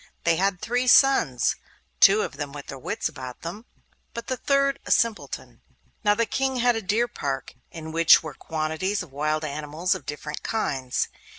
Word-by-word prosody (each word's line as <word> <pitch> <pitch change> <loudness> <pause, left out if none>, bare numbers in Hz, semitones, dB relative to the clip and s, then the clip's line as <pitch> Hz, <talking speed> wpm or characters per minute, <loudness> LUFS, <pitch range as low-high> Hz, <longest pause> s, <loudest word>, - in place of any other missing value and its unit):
They 165 -1 +3
had 195 -1 +1
three 245 +2 0
sons, 245 - +4 0.4
two 200 +2 +7
of 140 - -6
them 145 -1 -4
with 145 -1 -8
their 135 - -8
wits - - -2
about 130 -1 -8
them, 195 +8 -6 0.5
but 235 - -5
the 260 - -2
third 275 +2 +1
a - - -9
simpleton. 230 -2 -1 0.4
Now 205 -1 +4
the 230 +2 +1
King 265 +3 -1
had 245 -1 +3
a 225 - -2
deer 220 +5 +1
park 140 - -4 0.2
in 160 -1 -8
which 165 0 +6
were 155 -2 -6
quantities 160 +7 -2
of 165 - -14
wild 155 +2 -1
animals 155 +5 -2
of 185 - -8
different 150 0 -5
kinds. 135 - -1
170 Hz, 180 wpm, -25 LUFS, 150-230 Hz, 0.5 s, two